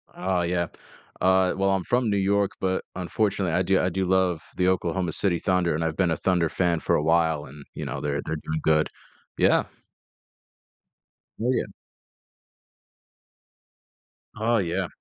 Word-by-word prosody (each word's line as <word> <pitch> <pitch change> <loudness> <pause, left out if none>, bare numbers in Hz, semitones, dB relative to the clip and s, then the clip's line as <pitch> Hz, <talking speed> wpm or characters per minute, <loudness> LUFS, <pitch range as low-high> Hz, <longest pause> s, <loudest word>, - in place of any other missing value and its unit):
Oh, 95 -1 0
yeah. 85 0 0 0.5
Uh, 95 0 +4
well, 95 0 +2
I'm 95 -1 0
from 120 +1 +1
New 100 - +1
York, 100 +1 +2
but 95 0 -1
unfortunately 95 -1 -1
I 90 - +2
do 95 +1 +2
I 90 - +1
do 95 +2 -1
love 90 -3 +1
the 90 0 +2
Oklahoma 90 -1 0
City 85 -2 +1
Thunder, 90 -3 +1
and 80 - -1
I've 80 -1 -1
been 90 -2 +1
a 80 - 0
Thunder 90 -4 +1
fan 85 -1 0
for - - +1
a 75 - +1
while 80 -2 +2
and, 70 +2 -12
you - - -5
know, - - -4
they're 70 -1 -1
they're 80 - -2
doing 80 +1 -4
good. 75 -1 +3 0.5
Yeah. - - +4 1.7
Oh, 120 +3 +1
yeah. 130 - 0 2.7
Oh, 115 +2 +2
yeah. 90 -1 -1
90 Hz, 160 wpm, -25 LUFS, 85-95 Hz, 2.7 s, Uh